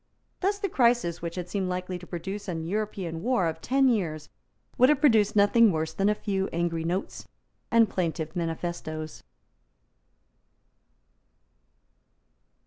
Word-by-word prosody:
Thus 400 Hz, +2 st, 0 dB
the 400 Hz, 0 st, -2 dB
crisis 235 Hz, -, +2 dB
which 170 Hz, 0 st, -5 dB
had 180 Hz, -1 st, -4 dB
seemed 190 Hz, 0 st, -2 dB
likely 180 Hz, 0 st, -3 dB
to 180 Hz, -, -12 dB
produce 195 Hz, +4 st, -5 dB
an 165 Hz, -3 st, -3 dB
European 190 Hz, -4 st, -3 dB
war 240 Hz, -4 st, +1 dB
of 160 Hz, 0 st, -3 dB
ten 270 Hz, +2 st, +3 dB
years 165 Hz, -10 st, -1 dB, 0.5 s
would 255 Hz, +2 st, +5 dB
have 300 Hz, -2 st, +3 dB
produced 225 Hz, -10 st, +4 dB
nothing 210 Hz, +2 st, +5 dB
worse 160 Hz, -1 st, -2 dB
than 195 Hz, +5 st, +1 dB
a 210 Hz, -, +2 dB
few 195 Hz, -2 st, -2 dB
angry 165 Hz, -1 st, -1 dB
notes 175 Hz, +4 st, -3 dB, 0.4 s
and 230 Hz, -1 st, +5 dB
plaintive 165 Hz, -4 st, -3 dB
manifestoes. 165 Hz, -, -4 dB
185 Hz, 135 wpm, -27 LUFS, 165-215 Hz, 0.5 s, would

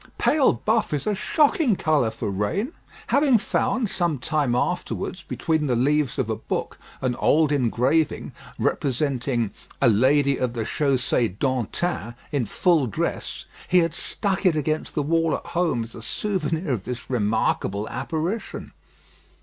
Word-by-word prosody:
Pale 295 Hz, -3 st, +4 dB
buff 220 Hz, -7 st, +2 dB
is 145 Hz, -, -3 dB
a 210 Hz, -, +1 dB
shocking 280 Hz, -, +2 dB
colour 155 Hz, -9 st, +2 dB
for 110 Hz, -2 st, -4 dB
rain." 165 Hz, -, -1 dB, 0.4 s
Having 280 Hz, -4 st, +5 dB
found, 235 Hz, +3 st, 0 dB
some 175 Hz, -6 st, 0 dB
time 140 Hz, -1 st, 0 dB
afterwards, -, -, -2 dB
between 160 Hz, -2 st, -1 dB
the 125 Hz, -, +1 dB
leaves 145 Hz, +2 st, +1 dB
of 130 Hz, -5 st, 0 dB
a 110 Hz, -, -1 dB
book, 110 Hz, -, -4 dB, 0.2 s
an 130 Hz, -2 st, 0 dB
old 155 Hz, -1 st, +3 dB
engraving, 135 Hz, +3 st, +1 dB, 0.3 s
representing 130 Hz, -4 st, 0 dB, 0.3 s
"a 135 Hz, -, +4 dB
lady 135 Hz, +5 st, +3 dB
of 125 Hz, -2 st, -1 dB
the 115 Hz, -2 st, -2 dB
Chaussée 125 Hz, -5 st, 0 dB
d'Antin" 130 Hz, -, -1 dB, 0.2 s
in 135 Hz, -7 st, 0 dB
full 160 Hz, -, +2 dB
dress, 105 Hz, -, -3 dB, 0.2 s
he 185 Hz, -, +3 dB
had 165 Hz, -2 st, +3 dB
stuck 195 Hz, +3 st, -2 dB
it 180 Hz, -5 st, +4 dB
against 155 Hz, +1 st, -2 dB
the 150 Hz, -, +1 dB
wall 165 Hz, +2 st, +2 dB
at -, -, -7 dB
home 165 Hz, -9 st, +1 dB
as 115 Hz, -, -11 dB
a 115 Hz, -, -9 dB
souvenir 165 Hz, -, -2 dB
of 110 Hz, -7 st, -1 dB
this 125 Hz, 0 st, -6 dB
remarkable 105 Hz, -3 st, 0 dB
apparition. 170 Hz, +7 st, -3 dB
145 Hz, 150 wpm, -24 LUFS, 120-170 Hz, 0.4 s, Having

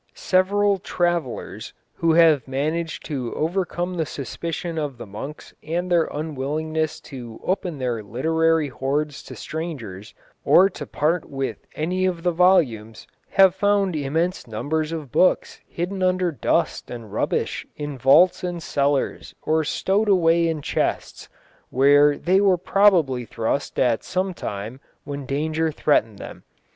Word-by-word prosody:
Several 200 Hz, +2 st, +2 dB
travellers 175 Hz, -8 st, -2 dB, 0.2 s
who 165 Hz, -1 st, +2 dB
have 160 Hz, -5 st, +5 dB
managed 155 Hz, +5 st, -2 dB
to 130 Hz, -6 st, -4 dB
overcome 175 Hz, +2 st, -1 dB
the 160 Hz, -, 0 dB
suspicion 165 Hz, +4 st, -4 dB
of 145 Hz, -4 st, -4 dB
the -, -, -8 dB
monks 110 Hz, +9 st, -9 dB
and 175 Hz, +3 st, -3 dB
their 170 Hz, -2 st, +4 dB
unwillingness 155 Hz, +1 st, -3 dB
to 120 Hz, -5 st, -9 dB
open 180 Hz, -4 st, -2 dB
their 125 Hz, -4 st, -2 dB
literary 160 Hz, +8 st, +1 dB
hoards 140 Hz, +3 st, -2 dB
to -, -, -10 dB
strangers, 115 Hz, -, -6 dB, 0.3 s
or 195 Hz, +2 st, +5 dB
to -, -, -8 dB
part 155 Hz, +3 st, -1 dB
with 135 Hz, -6 st, -4 dB
any 185 Hz, +4 st, 0 dB
of 175 Hz, -2 st, -3 dB
the 175 Hz, -, +2 dB
volumes, 135 Hz, -, +2 dB, 0.2 s
have 190 Hz, -2 st, +5 dB
found 200 Hz, -2 st, +1 dB
immense 160 Hz, +5 st, -1 dB
numbers 155 Hz, +8 st, -2 dB
of 155 Hz, -6 st, -6 dB
books 185 Hz, -, +2 dB
hidden 185 Hz, +3 st, -4 dB
under 185 Hz, -1 st, +2 dB
dust 140 Hz, -, -1 dB
and 115 Hz, -4 st, -8 dB
rubbish -, -, -1 dB
in 145 Hz, -1 st, -5 dB
vaults 140 Hz, +10 st, +5 dB
and 175 Hz, -2 st, -4 dB
cellars 140 Hz, -1 st, -1 dB
or 160 Hz, 0 st, +1 dB
stowed 200 Hz, +7 st, 0 dB
away 170 Hz, -3 st, +4 dB
in 160 Hz, -3 st, -2 dB
chests, -, -, -2 dB, 0.4 s
where 145 Hz, +2 st, +5 dB
they 190 Hz, +3 st, +2 dB
were 195 Hz, -3 st, +4 dB
probably 175 Hz, -9 st, +3 dB
thrust 115 Hz, +4 st, -3 dB
at 120 Hz, -3 st, +2 dB
some 185 Hz, +1 st, -2 dB
time 110 Hz, -, -6 dB, 0.2 s
when 140 Hz, -2 st, -6 dB
danger 155 Hz, +3 st, -1 dB
threatened 115 Hz, -9 st, +1 dB
them. -, -, -10 dB
160 Hz, 140 wpm, -23 LUFS, 135-175 Hz, 0.4 s, have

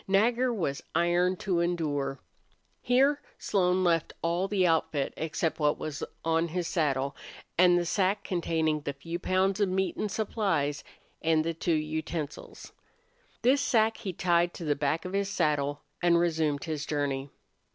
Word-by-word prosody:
Nagger 235 Hz, +6 st, +3 dB
was 165 Hz, -11 st, -2 dB
iron 175 Hz, +2 st, +3 dB
to 185 Hz, -1 st, -1 dB
endure. 145 Hz, -6 st, -1 dB, 0.6 s
Here 275 Hz, +4 st, +3 dB, 0.2 s
Slone 185 Hz, -1 st, +1 dB
left 165 Hz, -3 st, +1 dB
all 170 Hz, +3 st, +1 dB
the 195 Hz, -2 st, +2 dB
outfit 160 Hz, -4 st, +1 dB
except 160 Hz, +1 st, -2 dB
what 150 Hz, -1 st, +2 dB
was 155 Hz, -1 st, -5 dB, 0.2 s
on 165 Hz, +1 st, +2 dB
his 175 Hz, +1 st, -2 dB
saddle, 140 Hz, -4 st, 0 dB, 0.4 s
and 175 Hz, 0 st, +5 dB
the 175 Hz, -, 0 dB
sack 195 Hz, +3 st, +1 dB
containing 160 Hz, -4 st, 0 dB
the 140 Hz, -, -3 dB
few 165 Hz, +5 st, -6 dB
pounds 190 Hz, +2 st, +1 dB
of 200 Hz, -2 st, +2 dB
meat 190 Hz, +1 st, 0 dB
and 215 Hz, -, -1 dB
supplies, 195 Hz, -10 st, -1 dB, 0.4 s
and 160 Hz, -1 st, +3 dB
the 165 Hz, -, -1 dB
two 165 Hz, +1 st, 0 dB
utensils. 155 Hz, 0 st, -4 dB, 0.7 s
This 270 Hz, +3 st, +4 dB
sack 225 Hz, -2 st, +2 dB
he 205 Hz, -5 st, -4 dB
tied 175 Hz, -1 st, +1 dB
on 170 Hz, -, -5 dB
the 145 Hz, -1 st, +2 dB
back 150 Hz, +5 st, -1 dB
of 185 Hz, -, -5 dB
his 200 Hz, 0 st, 0 dB
saddle, 145 Hz, -5 st, 0 dB, 0.2 s
and 175 Hz, -1 st, +4 dB
resumed 160 Hz, -4 st, +1 dB
his 155 Hz, -2 st, -4 dB
journey. 140 Hz, -2 st, -1 dB
170 Hz, 155 wpm, -29 LUFS, 155-190 Hz, 0.7 s, and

